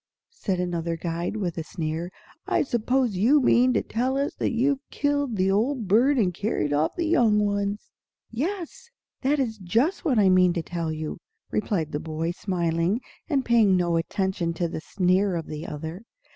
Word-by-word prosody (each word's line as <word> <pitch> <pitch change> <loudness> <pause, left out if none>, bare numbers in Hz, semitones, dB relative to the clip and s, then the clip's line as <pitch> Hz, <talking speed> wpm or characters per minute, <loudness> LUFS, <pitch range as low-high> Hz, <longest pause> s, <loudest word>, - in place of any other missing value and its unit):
said 195 - -2
another 170 -2 -2
guide, 170 +3 -3
with 175 -5 -2
a - - -3
sneer. 160 +1 -4 0.4
"I - - +2
suppose 245 -2 0
you 250 +10 +5
mean 255 -1 +4
to - - +1
tell 255 +4 -1
us 280 +1 -1
that - - 0
you've 265 +4 +1
killed 285 -4 0
the 190 0 +2
old 230 +2 0
bird 250 +9 +4
and 190 -7 +2
carried 175 -6 -1
off 150 +2 +1
the 345 - -1
young 240 -10 +3
ones?" 200 0 -2 0.4
"Yes, 370 - -4 0.3
that 280 +3 +2
is 230 -6 -2
just 230 - 0
what 280 -9 +1
I 205 -2 +5
mean 185 -1 +5
to 170 -2 -2
tell 170 -2 -3
you," 155 0 -5 0.3
replied 185 -7 -1
the 145 - -2
boy, 160 +1 -3
smiling, 175 +2 0 0.3
and 275 -4 +1
paying 220 -5 +4
no 175 -1 +1
attention 170 0 -1
to 170 +1 0
the 160 - -5
sneer 185 +2 +1
of 165 -2 -3
the 155 +1 -6
other. 160 +5 -6
195 Hz, 180 wpm, -25 LUFS, 170-250 Hz, 0.4 s, you